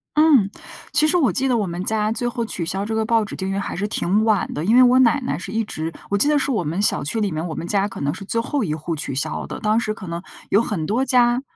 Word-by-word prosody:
嗯， 300 Hz, -10 st, +5 dB, 0.4 s
其 310 Hz, -, +3 dB
实 350 Hz, -, +2 dB
我 300 Hz, -8 st, +3 dB
记 270 Hz, -, 0 dB
得 255 Hz, -, +2 dB
我 215 Hz, -4 st, 0 dB
们 175 Hz, 0 st, -5 dB
家， 215 Hz, 0 st, +1 dB
最 230 Hz, +2 st, -2 dB
后 240 Hz, -1 st, -2 dB
取 175 Hz, -6 st, -4 dB
消 195 Hz, +4 st, -2 dB
这 220 Hz, -, -3 dB
个 220 Hz, 0 st, 0 dB
报 225 Hz, 0 st, +2 dB
纸 210 Hz, -, -8 dB
订 190 Hz, 0 st, -4 dB
阅 195 Hz, -, -2 dB
还 200 Hz, -, -3 dB
是 205 Hz, +3 st, -1 dB
挺 210 Hz, +1 st, +1 dB
晚 215 Hz, -3 st, +1 dB
的， 155 Hz, +3 st, -3 dB
因 220 Hz, -, +3 dB
为 255 Hz, -, +8 dB
我 250 Hz, +1 st, +5 dB
奶 260 Hz, +2 st, +4 dB
奶 250 Hz, -, -2 dB
是 190 Hz, +3 st, -7 dB
一 225 Hz, -, 0 dB
直 160 Hz, -5 st, -5 dB, 0.2 s
我 200 Hz, -, +1 dB
记 215 Hz, -, +7 dB
得 295 Hz, 0 st, +3 dB
是 280 Hz, -, 0 dB
我 215 Hz, -8 st, 0 dB
们 170 Hz, +7 st, -2 dB
小 205 Hz, -, +2 dB
区 220 Hz, +9 st, -1 dB
里 200 Hz, -3 st, 0 dB
面， 155 Hz, +2 st, -3 dB
我 160 Hz, -, -5 dB
们 170 Hz, -, -5 dB
家 200 Hz, +2 st, +1 dB
可 195 Hz, -, -8 dB
能 140 Hz, +1 st, 0 dB
是 195 Hz, -, -9 dB
最 230 Hz, +3 st, -1 dB
后 280 Hz, +3 st, -2 dB
一 155 Hz, -6 st, -2 dB
户 160 Hz, +2 st, -4 dB
取 145 Hz, -3 st, -4 dB
消 140 Hz, -, -3 dB
的。 -, -, -6 dB
当 215 Hz, +1 st, +2 dB
时 215 Hz, -2 st, -2 dB
可 210 Hz, -4 st, -10 dB
能 170 Hz, 0 st, -4 dB, 0.3 s
有 205 Hz, -, +4 dB
很 195 Hz, -9 st, -2 dB
多 235 Hz, +9 st, 0 dB
家 245 Hz, -1 st, +3 dB
215 Hz, 325 characters per minute, -21 LUFS, 185-240 Hz, 0.4 s, 为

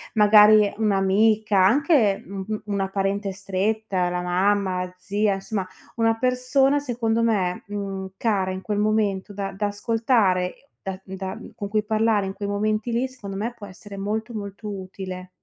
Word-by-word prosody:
Magari 210 Hz, -1 st, +7 dB
un'amica, 210 Hz, 0 st, +3 dB
anche 230 Hz, -, +3 dB
u 195 Hz, 0 st, -6 dB
u 215 Hz, -1 st, -3 dB
una 200 Hz, -2 st, -1 dB
parente 195 Hz, +1 st, -1 dB
stretta, 195 Hz, -1 st, -1 dB
la 180 Hz, 0 st, -2 dB
mamma, 185 Hz, +1 st, +1 dB
la 180 Hz, 0 st, -9 dB
zia, 200 Hz, +2 st, 0 dB
insomma 195 Hz, -1 st, -4 dB, 0.3 s
una 225 Hz, 0 st, +2 dB
persona 255 Hz, +3 st, +2 dB
secondo 230 Hz, -4 st, -1 dB
me, 195 Hz, -6 st, 0 dB
mhmm, 195 Hz, -2 st, -5 dB
cara 200 Hz, -5 st, 0 dB
in 185 Hz, 0 st, -4 dB
quel 205 Hz, +1 st, -2 dB
momento 210 Hz, -2 st, 0 dB
da 195 Hz, -1 st, -4 dB
da 205 Hz, +1 st, -1 dB
ascoltare, 205 Hz, 0 st, 0 dB
da 190 Hz, -1 st, -5 dB
da 190 Hz, +1 st, -6 dB, 0.2 s
con 200 Hz, -, -5 dB
cui 215 Hz, 0 st, +1 dB
parlare 220 Hz, -1 st, +1 dB
in 190 Hz, -, -4 dB
quei 200 Hz, +1 st, -5 dB
momenti 215 Hz, +3 st, -1 dB
lì, 240 Hz, +3 st, 0 dB
secondo 220 Hz, -7 st, -9 dB
me 225 Hz, +4 st, -3 dB
può 205 Hz, -4 st, -10 dB
essere 200 Hz, +2 st, -11 dB
molto, 215 Hz, +4 st, -3 dB
molto 205 Hz, 0 st, -6 dB
utile. 185 Hz, -1 st, -7 dB
205 Hz, 160 wpm, -24 LUFS, 195-220 Hz, 0.3 s, Magari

